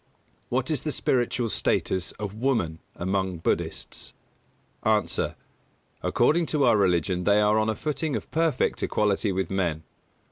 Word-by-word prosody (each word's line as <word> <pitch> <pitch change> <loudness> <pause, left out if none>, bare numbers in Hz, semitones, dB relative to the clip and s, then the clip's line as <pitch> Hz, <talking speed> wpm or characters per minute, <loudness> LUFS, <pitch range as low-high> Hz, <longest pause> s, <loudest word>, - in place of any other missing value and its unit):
What 130 +4 0
is 155 - 0
the 155 - -2
spiritual 120 -3 0
status 95 -2 0
of 100 -2 -5
woman 110 -9 0 0.2
among 95 0 -1
Buddhists? 80 - -3 0.7
A. 110 -2 +3 1.0
According 165 +1 +2
to 150 -3 +1
our 120 -2 +5
religion 90 -2 +2
they 100 +2 +4
are 105 +1 +4
on 110 0 +1
a 110 - 0
footing 150 0 -2
of - - -5
perfect 165 -1 +1
equality 105 0 +1
with 95 -1 -2
men. 85 -5 -1
105 Hz, 140 wpm, -26 LUFS, 95-130 Hz, 1.0 s, our